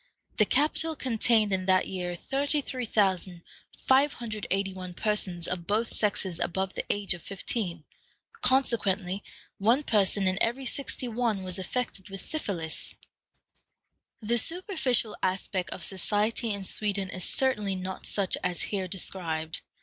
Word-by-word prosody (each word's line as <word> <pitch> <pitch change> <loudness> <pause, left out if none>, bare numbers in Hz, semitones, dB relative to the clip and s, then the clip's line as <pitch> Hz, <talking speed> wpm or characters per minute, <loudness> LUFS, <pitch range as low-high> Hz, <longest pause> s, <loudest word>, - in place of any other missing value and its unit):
The 215 - +6
capital 310 +6 +2
contained 225 -5 +2
in 185 0 -1
that 185 0 +4
year 180 -2 -3
33,581 210 - 0
persons 185 -5 0
of 175 -2 -4
both 220 +3 +1
sexes 190 -4 +1
above 190 +2 -1
the - - -3
age 205 -2 0
of 175 - -9
fifteen, 185 -3 -3 0.6
consequently 205 -7 +1 0.4
one 235 +8 +4
person 200 -4 +3
in 185 +1 +1
every 250 +4 +1
sixty 265 -1 -2
one 225 -4 0
was 185 0 +1
affected 205 -1 -3
with 195 -1 -6
syphilis. 185 - -3 1.3
The 235 +3 +3
superficial 270 - +2
aspect 185 0 -1
of - - -5
society 210 +4 0
in 200 -1 -3
Sweden 200 0 -1
is 185 -2 -4
certainly 210 -6 +1
not 185 0 -5
such 195 -3 +1
as 180 -1 0
here 195 -3 -2
described. 165 -4 -3
200 Hz, 125 wpm, -28 LUFS, 185-235 Hz, 1.3 s, The